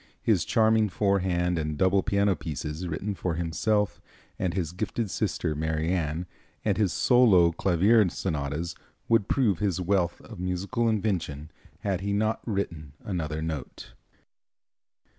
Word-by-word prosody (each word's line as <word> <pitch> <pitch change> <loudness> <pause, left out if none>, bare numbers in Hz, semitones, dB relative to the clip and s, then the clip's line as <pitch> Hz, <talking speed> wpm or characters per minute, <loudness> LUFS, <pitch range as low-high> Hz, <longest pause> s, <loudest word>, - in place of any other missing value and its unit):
His 100 -8 +2
charming 110 -2 +3
four 100 +1 +1
hand 90 -2 0
and 75 -1 -3
double 95 +3 +3
piano 100 -1 +2
pieces, 75 +2 -5
written 95 +6 -3
for 90 -3 -2
himself 95 +5 0 0.4
and 90 -2 -1
his 85 -5 -1
gifted 105 +3 -3
sister 90 -6 -1
Marianne, 80 +2 -1 0.4
and 105 -3 +2
his 100 -4 +1
solo 100 - +5
clavier 95 +5 +3
sonatas 80 -2 -3 0.3
would 115 -4 +3
prove 115 -10 +2
his 100 -3 0
wealth 90 -1 0
of - - -11
musical 95 +6 -1
invention 85 -8 -2 0.3
had 95 -3 -1
he 100 +1 -1
not 110 +2 0
written 85 -9 -3
another 80 -5 -3
note. 80 -6 -6
90 Hz, 135 wpm, -27 LUFS, 80-105 Hz, 0.4 s, solo